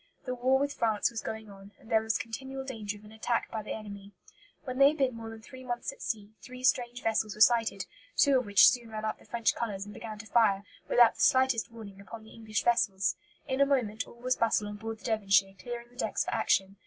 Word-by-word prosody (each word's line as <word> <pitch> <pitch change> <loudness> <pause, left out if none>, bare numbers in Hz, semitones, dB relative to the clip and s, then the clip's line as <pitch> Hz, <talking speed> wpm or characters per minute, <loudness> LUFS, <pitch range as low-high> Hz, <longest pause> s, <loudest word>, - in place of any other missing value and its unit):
The 255 - -2
war 255 +2 +2
with 285 +1 -1
France 220 0 +1
was 230 - -4
going 220 -1 -6
on, 195 +1 -14
and 220 - -16
there 220 - +4
was 220 0 0
continual 265 +4 -6
danger 215 -6 -5
of 210 - -17
an 210 - -13
attack 225 +2 -2
by 220 - -3
the 210 - -8
enemy. 200 -2 -9 0.5
When 255 -1 -5
they 275 - +8
had 305 +2 +1
been 265 -3 +1
more 225 -1 -7
than 225 0 -10
three 260 +2 -11
months 240 0 -3
at - - -18
sea, 215 -2 -4
three 255 0 -10
strange 245 -1 +1
vessels 220 -2 0
were 215 - -8
sighted, 225 -4 +4 0.3
two 275 -3 +5
of 250 - -6
which 200 0 +8
soon 240 -2 +1
ran 215 0 -5
up 215 - -3
the - - -19
French 235 -1 +1
colours 200 -4 -4
and 205 - -10
began 215 0 -7
to 215 - -10
fire, 215 -4 +3 0.3
without 240 -2 +6
the - - -8
slightest 260 -3 +3
warning, 205 -4 -11
upon 220 +2 -10
the 220 - -15
English 220 -2 -3
vessels. 195 -5 +2 0.3
In 265 0 0
a - - +7
moment 225 -6 0
all - - -14
was 255 +1 0
bustle 220 -2 +1
on 205 0 -6
board 225 +1 -6
the - - -16
Devonshire, 195 -4 +2
clearing 240 -1 -7
the 245 - -21
decks - - -1
for - - -3
action. 195 +1 +1
225 Hz, 245 wpm, -30 LUFS, 210-245 Hz, 0.5 s, they